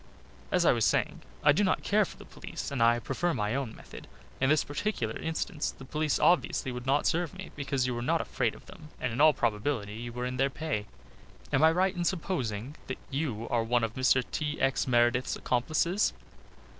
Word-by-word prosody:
"As - - +3
I - - +7
was - - +1
saying, - - +1 0.2
I 145 - +7
do 170 +8 +2
not 190 - +1
care 210 0 +3
for - - -11
the - - -12
police, - - -7
and 135 -4 -2
I 115 +1 +5
prefer 150 +8 -1
my 105 +1 -1
own 130 -4 -3
method. - - -12 0.3
In 130 - +2
this 155 0 +4
particular 145 - -2
instance 160 -1 -2
the 135 - -10
police 150 +2 0
obviously 170 -6 +2
would 125 +1 -6
not 140 +2 +2
serve 175 +2 0
me, 190 0 -8
because 140 -3 -1
you 125 -1 -1
are 120 - -3
not 120 - +1
afraid - - -1
of - - -15
them 150 - -13
and 125 -2 -2
in 130 - 0
all 155 0 +8
probability 110 -3 -1
you 120 +2 -7
are 125 - -1
in 125 0 -3
their 135 +1 +2
pay 135 -8 -3 0.7
am 135 - +4
I 160 - +7
right 185 +3 +1
in 175 - -1
supposing 145 - -2
that 130 - -4
you 135 -6 -2
are 120 -1 +1
one 120 +1 +1
of 115 -1 -1
Mr. 130 0 +3
T. 150 -1 -2
X. 135 0 +1
Meredith's 120 0 +2
accomplices!" 155 +10 +1
135 Hz, 210 wpm, -29 LUFS, 120-155 Hz, 0.7 s, all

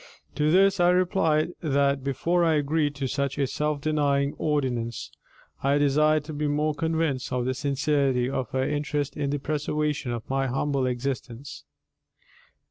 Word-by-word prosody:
To 150 0 +1
this 195 +3 +4
I 175 0 +5
replied 180 -4 +2
that 140 -3 +1
before 165 +6 +1
I 165 -2 +3
agreed 150 0 0
to 140 -1 -2
such 140 +1 -2
a 140 - +2
self 150 +2 -2
denying 145 -2 +1
ordinance, 125 -7 -1 0.5
I 140 +1 +2
desired 150 +1 +3
to 155 +1 -8
be 150 0 -1
more 150 +1 +1
convinced 160 -4 -1
of 125 -1 -1
the 130 - 0
sincerity 140 -2 +1
of 130 -2 -3
her 130 0 -1
interest 145 -1 -2
in 145 -2 -2
the 145 - 0
preservation 150 -2 -2
of 115 -2 -5
my 135 0 0
humble 135 +1 0
existence. 125 0 -5
145 Hz, 155 wpm, -26 LUFS, 135-150 Hz, 0.5 s, I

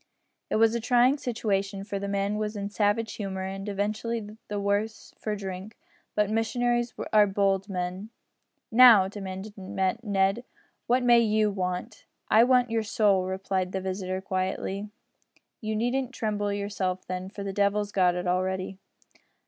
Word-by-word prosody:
It - - 0
was 225 +1 +4
a 235 - 0
trying 245 +4 +4
situation, 200 -6 -1
for 200 -1 -4
the 200 - -4
man 200 +1 -1
was 215 0 -2
in 200 -1 -3
a - - -4
savage 210 +1 +1
humour, 190 -2 -4
and 195 +2 -5
evidently 215 +2 -3
the 205 -1 -3
worse 205 +2 -2
for 215 -1 -2
drink. 195 +1 -7 0.4
But 210 -1 +2
missionaries 240 +2 0 0.2
are 210 -1 +6
bold 195 0 +1
men. 185 +2 -4 0.6
"Now," 225 -5 +8
demanded 195 +1 -7
Ned, 195 +2 0 0.4
"what 250 +1 +3
may 240 -1 +6
you 215 -2 +2
want?" 185 +3 -4 0.3
"I 220 +2 +7
want 250 -2 +3
your 225 -1 +1
soul," 205 -3 +2
replied 190 -1 -2
his 190 -1 -3
visitor, 185 0 -3
quietly. 190 +2 -3 0.7
"You 215 -1 -3
needn't 250 +3 -1
trouble 205 -2 -1
yourself, 200 -2 -2
then, 185 +1 -4
for 200 0 -7
the 195 -1 -4
devil's 205 +1 +1
got 180 -3 +3
it 180 0 -3
already." 185 +1 -1
205 Hz, 155 wpm, -27 LUFS, 190-220 Hz, 0.7 s, Now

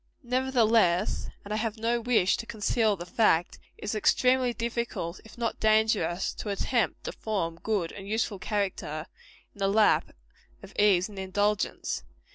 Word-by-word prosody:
Nevertheless 230 -7 +2 0.2
and 205 - -4
I - - 0
have 220 0 -2
no 235 +2 0
wish 225 -6 +3
to 230 - -6
conceal 220 0 +1
the 175 -2 -8
fact 175 -3 +2 0.2
it - - -13
is 205 - -2
extremely 250 +3 +3
difficult, 235 -7 -3
if 220 - -15
not 235 -1 -2
dangerous, 215 -5 +2
to 210 - -5
attempt 220 +3 0
to - - -4
form 170 -6 -3
good 195 -5 -1
and 195 -1 -9
useful 215 -2 -1
character 185 -6 -2 0.5
in - - -19
the 195 - +2
lap 210 +2 +3 0.5
of 195 - -12
ease 195 -3 +4
and 205 -2 -9
indulgence. 205 +2 -1
210 Hz, 155 wpm, -28 LUFS, 190-230 Hz, 0.5 s, ease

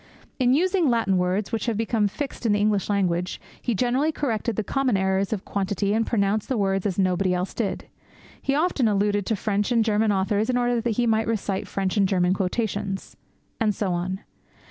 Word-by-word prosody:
In 255 0 +4
using 360 -1 +2
Latin 225 -5 +2
words 185 +4 0
which 225 +1 -2
have 230 -3 0
become 225 -1 +1
fixed 255 +2 -4
in 210 - +3
the 205 - +2
English 205 -1 +1
language, 180 -3 0 0.2
he 240 - -1
generally 255 +8 +1
corrected 235 -7 -2
the 220 - -1
common 260 -2 +1
errors 190 0 0
of 210 -4 -3
quantity 200 0 -1
and 225 +1 +1
pronounced 205 -2 0
words 195 -5 +1
as 190 - -3
nobody 185 -1 +2
else 180 +1 -2
did. 220 -4 -2 0.6
He 275 - 0
often 300 -6 +2
alluded 205 -1 +1
to 225 - +1
French 205 +2 -1
and 230 -2 +3
German 215 0 +2
authors 200 +3 +1
in 250 - +2
order 245 -1 +1
that 230 -2 -1
he 245 - +2
might 220 -1 +2
recite 205 -3 -2
French 195 0 -2
and 195 -1 +4
German 180 -2 +2
quotations.' 195 0 -2 0.4
And 215 -3 +1
so 190 -3 -1
on. 185 +3 -3
210 Hz, 195 wpm, -24 LUFS, 195-230 Hz, 0.6 s, In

